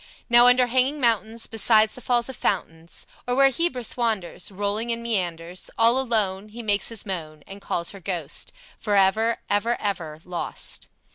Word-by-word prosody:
Now 240 +1 +8
under 250 0 +5
hanging 260 +4 +1
mountains, 230 -2 0
Beside 220 -1 +4
the 250 - -9
falls 240 -1 +1
of 265 - -6
fountains, 165 -5 -3 0.2
Or 245 - 0
where 275 +1 +6
Hebrus 260 -5 -1
wanders, 220 -8 -1
Rolling 205 +4 -2
in 235 0 -2
meanders, 180 -5 -3
All 230 +3 +5
alone, 215 -5 -1
He 235 +3 -9
makes 205 -2 +1
his 230 -3 -6
moan, 160 -6 -6
And 200 +1 -11
calls 170 -3 -2
her 195 - -11
ghost, 170 -6 -2 0.3
Forever, 210 +3 +2
ever, 215 +4 0
ever 170 -7 -3
lost! 180 -1 -4
215 Hz, 160 wpm, -24 LUFS, 190-235 Hz, 0.3 s, Now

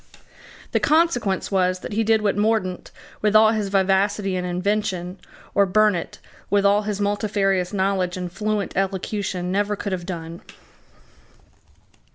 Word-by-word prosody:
The - - +2
consequence 295 - +1
was 185 -1 +1
that - - -6
he 225 +2 +1
did 220 0 +2
what 205 - +1
Mordaunt, 205 -3 0 0.3
with 210 0 +1
all 215 0 +7
his 215 -2 -1
vivacity 195 0 +1
and 180 0 -2
invention, 185 0 -2 0.3
or 200 -1 +3
Burnet, 205 -2 +1 0.3
with 200 0 +2
all 200 +1 +4
his 210 -1 -3
multifarious 200 -3 0
knowledge 190 -2 0
and 180 -1 -5
fluent 210 +1 -2
elocution 190 -1 -2
never 205 +2 0
could 200 - -5
have 180 -1 -4
done. 170 -2 -6
200 Hz, 140 wpm, -22 LUFS, 185-210 Hz, 0.3 s, all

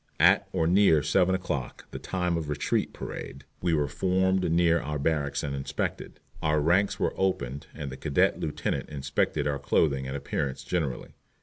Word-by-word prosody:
At - - +5
or 80 - +1
near 85 -4 +5
seven 90 +5 +3
o'clock, 75 -8 -4
the - - -6
time 90 -2 -1
of 80 -3 -3
retreat 75 -1 0
parade, 70 +2 -7 0.2
we 85 -2 +2
were 75 -1 +1
formed 95 +4 +1
near 85 0 +4
our 75 0 -3
barracks 70 -1 0
and 70 -1 -2
inspected. 70 0 -4 0.2
Our 75 0 +2
ranks 90 +7 +2
were - - +1
opened 70 -8 -1
and 70 -2 -5
the 65 - -7
cadet 75 -3 +2
lieutenant 75 - -2
inspected 70 -2 -1
our 70 -1 -1
clothing 70 -2 +1
and 65 +1 -3
appearance 70 -1 -3
generally. 80 -8 -3
75 Hz, 170 wpm, -27 LUFS, 70-90 Hz, 0.2 s, At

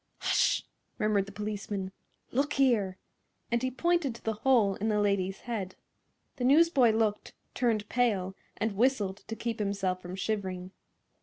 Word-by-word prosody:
"Hush!" - - +2 0.3
murmured 210 -3 +1
the - - -9
policeman. 205 -2 -4 0.4
"Look 285 +4 +1
here!" 225 -9 +2 0.5
and 235 0 +2
he 260 - 0
pointed 320 -1 +1
to - - -13
the 225 - 0
hole 220 -3 +3
in 215 +3 -2
the 210 -1 +2
lady's 195 -2 0
head. 205 -6 -4 0.6
The 250 - -3
newsboy 280 -2 +5
looked, 215 -2 0 0.2
turned 225 -4 0
pale 205 -7 +1 0.2
and 220 -2 -1
whistled 210 -4 +1
to 225 - -7
keep 230 -1 -3
himself 195 -3 -1
from 180 +1 -7
shivering. 190 -3 -3
215 Hz, 150 wpm, -30 LUFS, 195-245 Hz, 0.6 s, newsboy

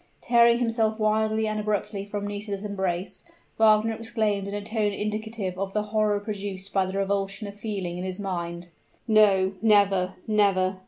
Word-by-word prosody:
Tearing 235 -1 +4
himself 225 -2 0
wildly 220 0 +1
and 215 0 -2
abruptly 210 -1 -2
from 205 0 -4
Nisida's 205 0 -4
embrace, 190 -3 -3 0.4
Wagner 220 0 +4
exclaimed 220 -3 -1
in 200 - -5
a 205 - -4
tone 215 -1 0
indicative 215 -2 -3
of 195 0 -3
the 210 - 0
horror 215 -1 +2
produced 200 -2 -4
by 190 -1 +2
the 190 +1 -4
revulsion 195 +1 -1
of 200 - -7
feeling 195 -5 -4
in - - -4
his 185 +1 -4
mind, 175 -3 -4 0.4
"No 200 -3 +4
never 200 -4 +3
never!" 195 -3 +2
205 Hz, 160 wpm, -26 LUFS, 195-215 Hz, 0.4 s, Tearing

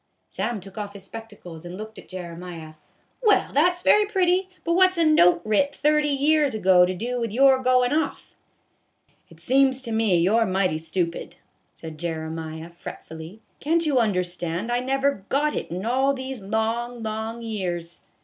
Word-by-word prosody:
Sam 215 +3 -3
took 195 +3 -10
off 205 -1 -5
his 200 -2 -11
spectacles, 195 -6 -10
and 175 +1 -8
looked 215 +1 -8
at - - -15
Jere 180 -2 -7
miah. 165 -3 -9 0.3
" - - -42
Well, 430 -4 +3
that 350 +5 +3
's 355 - -12
very 420 0 +5
pretty. 375 -2 +1
But 335 - 0
what 370 +1 +4
's - - -10
a 335 - +3
note 180 - +5
writ 250 +7 +1
thirty 300 0 +2
years 290 -1 +2
ago 185 -3 +5
to 185 - -3
do 245 +6 -3
with 230 -2 -2
your 265 +3 +5
goin' 255 0 +2
off? 320 +1 -2 0.3
" - - -45
" - - -40
It - - -17
seems 265 0 +3
to 235 - -4
me 220 -5 +2
you 180 +6 +3
're 225 - +2
mighty 185 -4 0
stupid," 165 +1 -3 0.4
said 160 -1 -9
Jere 160 -1 -4
miah, 160 +1 -7
fretfully; 165 +4 -10
" - - -42
can't 330 +3 +1
you 285 -4 +2
understand, 180 -1 -1
I 240 - +1
never 270 -3 0
got 295 +2 +1
it - - -4
in 180 +4 -5
all 265 +4 +2
these 260 -2 -5
long, 225 +3 -2
long 220 +2 -4
years 175 -6 -4
220 Hz, 195 wpm, -24 LUFS, 180-270 Hz, 0.4 s, very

